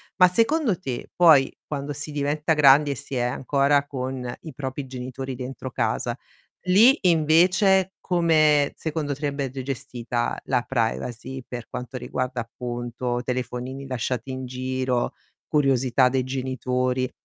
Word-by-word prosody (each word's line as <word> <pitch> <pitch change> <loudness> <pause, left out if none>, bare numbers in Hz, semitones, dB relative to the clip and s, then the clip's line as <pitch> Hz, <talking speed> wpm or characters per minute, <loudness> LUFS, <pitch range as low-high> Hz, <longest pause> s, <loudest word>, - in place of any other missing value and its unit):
Ma 180 - +7
secondo 230 - +2
te, 130 -9 -5
poi, 155 -6 +5
quando 145 -1 -4
si 150 +2 -5
diventa 150 +2 0
grandi 145 -1 +6
e 140 - -2
si 140 0 -7
è 125 - 0
ancora 140 +3 +1
con 130 -2 -4
i 160 - -9
propri 135 +1 -5
genitori 130 +1 -6
dentro 130 +1 -6
casa, 120 +1 -1 0.5
lì 220 +10 +6
invece 180 +3 +4
come, 155 -4 +3
secondo 155 -2 -3
te, - - -15
andrebbe 140 -3 -3
gestita 120 -2 -3
la 125 -2 +1
privacy, 125 +2 -3
per 120 -2 -7
quanto 125 +1 -6
riguarda, 125 0 -3
appunto, 120 +1 -4
telefonini 125 +2 -4
lasciati 125 -1 -3
in 130 0 -5
giro, 130 0 -2 0.3
curiosità 130 -3 +3
dei 130 0 0
genitori? 130 -1 -1
130 Hz, 130 wpm, -24 LUFS, 125-150 Hz, 0.5 s, Ma